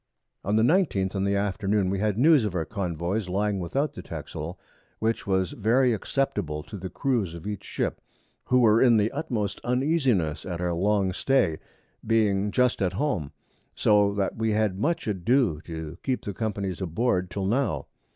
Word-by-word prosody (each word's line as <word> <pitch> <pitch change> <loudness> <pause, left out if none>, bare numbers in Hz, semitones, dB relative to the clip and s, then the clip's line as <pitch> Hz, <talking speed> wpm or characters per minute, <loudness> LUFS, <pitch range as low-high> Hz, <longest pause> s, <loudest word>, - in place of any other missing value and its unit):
On 100 +3 0
the 110 - +4
19th 120 - +2
in 95 -1 -1
the 100 0 +1
Afternoon, 100 -1 0
we 100 - -1
had 105 0 0
News 145 +1 +5
of 105 -4 -2
our 80 -2 -1
Convoys 90 +1 -2
lying 100 +1 0
without 135 - -1
the - - -7
Texel, 85 +5 -7 0.4
which 110 -1 -1
was 95 -2 +1
very 120 +4 +2
acceptable 100 - -2
to 105 - -10
the 95 0 -6
Crews 115 - -1
of 85 - -10
each 105 -2 -4
Ship, - - -3 0.4
who 125 0 +3
were 110 -1 +5
in 120 -3 +6
the 105 +1 +2
utmost 120 - -3
Uneasiness 125 - +1
at 90 -2 -5
our 90 -1 -1
long 95 +1 +1
Stay, 100 - +1 0.4
being 105 -3 +2
just 125 +1 +1
at 95 -1 +1
Home, 90 - -1 0.4
so 105 -1 +3
that 100 -1 -1
we 110 -1 0
had 105 -3 0
much 165 +8 0
ado 105 - +1
to 80 0 -7
keep 130 -2 -2
the 100 - -3
Companies 100 -4 -3
aboard 90 +1 0
till 95 +2 -3
now. 120 +3 0
105 Hz, 175 wpm, -26 LUFS, 95-120 Hz, 0.4 s, in